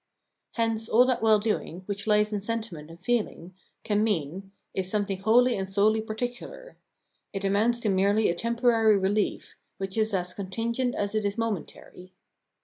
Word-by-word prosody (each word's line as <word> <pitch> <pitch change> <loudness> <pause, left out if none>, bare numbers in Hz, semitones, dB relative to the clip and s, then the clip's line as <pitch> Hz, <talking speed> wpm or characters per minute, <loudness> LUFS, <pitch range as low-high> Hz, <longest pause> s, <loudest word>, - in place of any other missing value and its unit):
Hence 225 -1 0
all 245 +3 +6
that 255 -2 0
well 220 -1 +5
doing, 205 -4 -3
which 200 +1 -5
lies 210 0 +3
in 205 - -1
sentiment 210 -8 -5
and 165 +1 -12
feeling, 190 -4 -2 0.3
can 210 0 +1
mean, 195 -1 -2 0.2
is 190 -1 -1
something 200 -2 -1
wholly 235 +4 +4
and 190 -1 -3
solely 215 +3 +3
particular; 245 - -6 0.6
it 195 0 -3
amounts 215 +5 +2
to 215 - 0
merely 200 +3 +3
a - - +1
temporary 230 +1 +3
relief, 200 +2 -1 0.2
which 195 +2 -3
is 220 0 +1
as 180 -2 -1
contingent 230 +6 -2
as 205 0 -2
it 215 -1 0
is 200 +1 -2
momentary. 190 -4 -5
210 Hz, 160 wpm, -27 LUFS, 195-225 Hz, 0.6 s, all